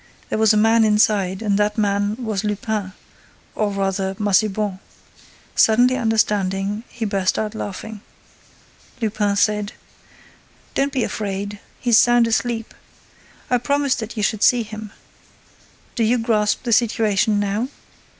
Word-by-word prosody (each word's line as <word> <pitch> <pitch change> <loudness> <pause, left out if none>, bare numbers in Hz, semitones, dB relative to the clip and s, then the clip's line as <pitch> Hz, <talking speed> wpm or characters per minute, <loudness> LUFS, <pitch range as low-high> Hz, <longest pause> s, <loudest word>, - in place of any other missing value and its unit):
There - - -1
was 220 -1 +5
a 215 - +3
man 225 +1 +4
inside 210 -2 +2
and 205 -2 +1
that 210 +1 0
man 205 0 0
was 220 -5 -3
Lupin, 210 -2 -3 0.6
or 215 -1 0
rather 195 -1 -2
Massiban. 205 -1 +1 0.7
Suddenly 245 +3 +4
understanding, 210 -3 0
he 230 -1 -5
burst 195 -3 0
out 215 0 -2
laughing. 215 0 -6 1.0
Lupin 210 -3 0
said: 210 +1 +1 1.0
"Don't 275 +1 0
be 260 -4 0
afraid, 200 0 -4 0.2
he's 235 -3 +4
sound 240 -1 +4
asleep. 230 0 -1 0.8
I 250 - +3
promised 280 +2 0
that 225 +1 -6
you 210 - -1
should 210 0 0
see 245 0 +4
him. 215 -1 -9 1.0
Do 235 - 0
you 235 +3 +3
grasp 215 -2 0
the 235 -2 0
situation 215 -2 +2
now? 205 +4 -1
215 Hz, 130 wpm, -21 LUFS, 205-225 Hz, 1.0 s, was